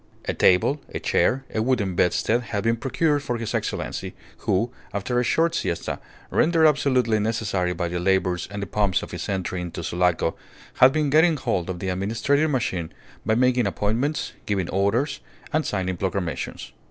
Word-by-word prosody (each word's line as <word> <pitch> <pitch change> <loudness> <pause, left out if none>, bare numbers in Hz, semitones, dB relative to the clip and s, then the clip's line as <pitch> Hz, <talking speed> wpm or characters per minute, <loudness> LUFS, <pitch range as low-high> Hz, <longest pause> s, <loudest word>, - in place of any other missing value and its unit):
A - - -1
table, 115 +11 +3
a - - -4
chair, 135 +1 +1
a 110 - 0
wooden 110 -6 +1
bedstead 110 +7 +2
had 105 -4 -3
been 115 0 +2
procured 145 +4 0
for 125 -4 -2
His 115 -2 -4
Excellency, - - -3 0.2
who, 115 +6 0 0.2
after 120 +5 0
a - - +2
short 165 +7 +2
siesta, 85 - -2 0.3
rendered 165 -1 +3
absolutely 130 -7 +3
necessary 105 -4 0
by 85 0 -2
the 90 +1 -3
labours 90 -1 +1
and 100 0 -5
the - - -2
pomps 100 -2 +1
of - - -8
his - - -5
entry 95 -2 -2
into 85 -1 -5
Sulaco, 85 -1 +1 0.4
had 130 +1 +7
been 150 -1 0
getting 160 +1 +5
hold 95 -10 -1
of 90 - -3
the 95 +1 -3
administrative 115 +11 +1
machine 95 - -1 0.4
by 110 - +3
making 125 -2 +3
appointments, 115 +10 -1
giving 95 -4 -1
orders, 115 +9 +1 0.3
and 155 0 +1
signing 95 -2 -2
proclamations. 95 -3 -3
110 Hz, 170 wpm, -24 LUFS, 95-130 Hz, 0.4 s, had